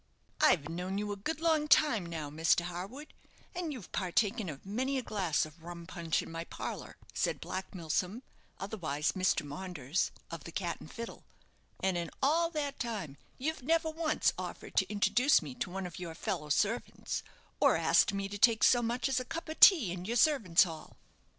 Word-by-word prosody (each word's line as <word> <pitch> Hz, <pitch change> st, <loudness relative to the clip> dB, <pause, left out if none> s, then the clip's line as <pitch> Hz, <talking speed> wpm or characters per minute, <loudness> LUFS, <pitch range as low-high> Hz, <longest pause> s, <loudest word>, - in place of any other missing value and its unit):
"I've 150 Hz, -4 st, +4 dB
known 180 Hz, +4 st, -3 dB
you 205 Hz, 0 st, -2 dB
a -, -, -2 dB
good 305 Hz, +11 st, -3 dB
long 315 Hz, -2 st, +2 dB
time 275 Hz, -, +4 dB
now, 160 Hz, -4 st, -5 dB
Mr. 160 Hz, +3 st, +3 dB
Harwood, 185 Hz, -, -7 dB, 0.4 s
and 345 Hz, -3 st, -3 dB
you've 245 Hz, -10 st, -8 dB
partaken 200 Hz, +2 st, 0 dB
of 145 Hz, +2 st, -9 dB
many 260 Hz, +7 st, -1 dB
a 260 Hz, -, -2 dB
glass 185 Hz, -10 st, 0 dB
of 155 Hz, +2 st, -14 dB
rum 170 Hz, 0 st, -8 dB
punch 165 Hz, -2 st, -1 dB
in -, -, -10 dB
my 165 Hz, 0 st, -4 dB
parlour," -, -, -6 dB, 0.2 s
said -, -, 0 dB
Black 190 Hz, +1 st, -5 dB
Milsom, 180 Hz, -, -2 dB, 0.4 s
otherwise 160 Hz, -7 st, -1 dB
Mr. 185 Hz, -5 st, +1 dB
Maunders, 150 Hz, 0 st, -2 dB, 0.2 s
of 165 Hz, -3 st, -6 dB
the 170 Hz, -, -8 dB
"Cat 170 Hz, -1 st, -3 dB
and -, -, -11 dB
Fiddle 230 Hz, 0 st, -7 dB, 0.3 s
"; -, -, -37 dB
"and 190 Hz, -2 st, +2 dB
in 170 Hz, -1 st, -4 dB
all 325 Hz, +5 st, +3 dB
that 295 Hz, -4 st, -3 dB
time 210 Hz, -, -4 dB, 0.2 s
you've 315 Hz, +3 st, -2 dB
never 320 Hz, +4 st, +1 dB
once 315 Hz, 0 st, +1 dB
offered -, -, -7 dB
to -, -, +3 dB
introduce 240 Hz, +6 st, +4 dB
me 140 Hz, -4 st, -6 dB
to 125 Hz, -, -4 dB
one 190 Hz, +1 st, -4 dB
of 175 Hz, -1 st, -7 dB
your 170 Hz, -2 st, -6 dB
fellow 160 Hz, -3 st, -3 dB
servants, 210 Hz, +10 st, -1 dB, 0.4 s
or -, -, +5 dB
asked -, -, +4 dB
me 195 Hz, 0 st, -2 dB
to 205 Hz, +1 st, -6 dB
take 225 Hz, 0 st, +5 dB
so 245 Hz, -, +6 dB
much 240 Hz, +3 st, 0 dB
as 265 Hz, -1 st, +1 dB
a -, -, -3 dB
cup 325 Hz, +5 st, -6 dB
of 315 Hz, -, -6 dB
tea 295 Hz, -, +8 dB
in 180 Hz, 0 st, -5 dB
your 235 Hz, +4 st, 0 dB
servants' 225 Hz, -, +5 dB
hall." 165 Hz, -4 st, -8 dB
195 Hz, 195 wpm, -32 LUFS, 170-255 Hz, 0.4 s, tea